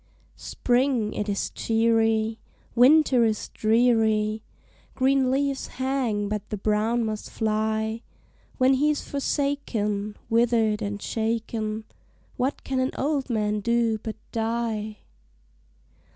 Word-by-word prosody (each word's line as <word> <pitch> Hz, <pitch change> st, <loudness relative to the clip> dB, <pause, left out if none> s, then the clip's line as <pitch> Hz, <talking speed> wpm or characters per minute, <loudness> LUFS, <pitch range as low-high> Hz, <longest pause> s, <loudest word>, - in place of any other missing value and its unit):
Spring 245 Hz, -3 st, 0 dB
it 210 Hz, 0 st, -3 dB
is 200 Hz, -, -2 dB
cheery, 225 Hz, -1 st, +1 dB, 0.3 s
Winter 260 Hz, 0 st, +5 dB
is 220 Hz, -2 st, -1 dB
dreary, 220 Hz, -1 st, +2 dB, 0.5 s
Green 265 Hz, 0 st, +2 dB
leaves 275 Hz, +1 st, 0 dB
hang, 255 Hz, -6 st, -1 dB
but 210 Hz, 0 st, -4 dB
the 210 Hz, -, -3 dB
brown 215 Hz, +3 st, +1 dB
must 215 Hz, -1 st, -4 dB
fly; 220 Hz, 0 st, -1 dB, 0.6 s
When 260 Hz, +1 st, +4 dB
he's 295 Hz, +2 st, +1 dB
forsaken, 235 Hz, -8 st, -2 dB
Withered 225 Hz, -2 st, +2 dB
and 205 Hz, -1 st, -3 dB
shaken, 220 Hz, -1 st, -2 dB, 0.5 s
What 260 Hz, +3 st, -2 dB
can 265 Hz, -1 st, -2 dB
an 260 Hz, 0 st, 0 dB
old 280 Hz, -1 st, -1 dB
man 210 Hz, -2 st, 0 dB
do 230 Hz, 0 st, +1 dB
but 220 Hz, -1 st, -5 dB, 0.2 s
die? 225 Hz, -2 st, -2 dB
225 Hz, 110 wpm, -25 LUFS, 215-255 Hz, 0.6 s, Winter